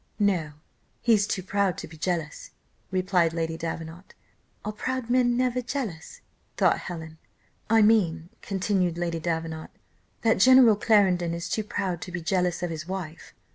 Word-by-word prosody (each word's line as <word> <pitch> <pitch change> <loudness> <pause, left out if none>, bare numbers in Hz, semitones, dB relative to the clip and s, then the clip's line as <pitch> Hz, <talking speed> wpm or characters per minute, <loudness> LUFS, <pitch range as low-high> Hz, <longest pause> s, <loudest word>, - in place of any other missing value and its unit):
"No: 185 -8 +1 0.5
he's 215 -4 +4
too 185 - -2
proud 195 -1 0
to 165 - -6
be 160 - -13
jealous," 165 -1 -3 0.4
replied 185 -3 +1
Lady 165 -1 -2
Davenant. 165 +2 -7 0.5
Are 210 - -2
proud 250 +2 -3
men 245 -1 +3
never 250 0 +1
jealous? 230 - -5 0.4
thought - - +3
Helen. 160 -3 -8 0.5
"I 225 0 +5
mean," 180 -7 +2
continued 190 -3 0
Lady 170 -1 -2
Davenant, 160 -1 -3 0.5
"that 225 -3 +3
General 255 0 +7
Clarendon 185 -6 +2
is 170 +1 -5
too 215 - -1
proud 195 -5 -3
to 180 - -7
be 175 - -3
jealous 180 +1 0
of 175 - -2
his 155 0 -6
wife. 185 -4 -7
180 Hz, 150 wpm, -26 LUFS, 165-210 Hz, 0.5 s, General